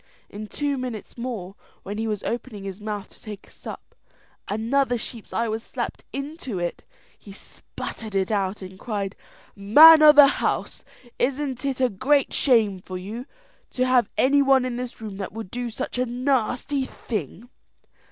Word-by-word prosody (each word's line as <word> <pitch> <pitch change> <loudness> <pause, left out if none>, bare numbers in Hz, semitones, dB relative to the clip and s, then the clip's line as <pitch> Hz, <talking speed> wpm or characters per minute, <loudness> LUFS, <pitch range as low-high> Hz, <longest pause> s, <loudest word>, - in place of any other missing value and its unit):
In 210 +1 -7
two 285 +3 -2
minutes 245 -5 -6
more, 230 -7 -5 0.3
when 205 +2 -5
he 225 - -1
was 210 -2 -3
opening 230 -4 -4
his 195 +1 -7
mouth 210 -1 -5
to - - -22
take 210 -2 -9
a - - -20
sup, - - -10 0.5
another 245 +4 +1
sheep's 230 -1 -7
eye 230 +1 0
was 220 +1 -2
slapped - - -5
into 275 - -5
it. 175 -1 -3 0.4
He 200 - -13
sputtered 210 +1 -8
it 190 +1 +1
out, 195 -1 -1
and 185 0 -10
cried, 200 -4 -3 0.4
"Man 305 +11 +9
o' 305 -1 +10
the 295 -1 +9 0.2
house, - - -2 0.4
isn't 270 0 -1
it 270 -2 -1
a 255 - +4
great 270 +8 +1
shame 220 -8 +3
for 185 0 -7
you 215 +8 -7 0.4
to 255 - 0
have 255 -4 +3
any 280 +2 +4
one 270 -2 +4
in 250 -1 -3
the 250 0 -4
room 215 -3 -7
that 195 - -5
would 220 -4 -7
do 245 0 -3
such 235 +2 -4
a 250 - +2
nasty 255 +2 0
thing?" 220 - -6
235 Hz, 170 wpm, -24 LUFS, 205-260 Hz, 0.5 s, o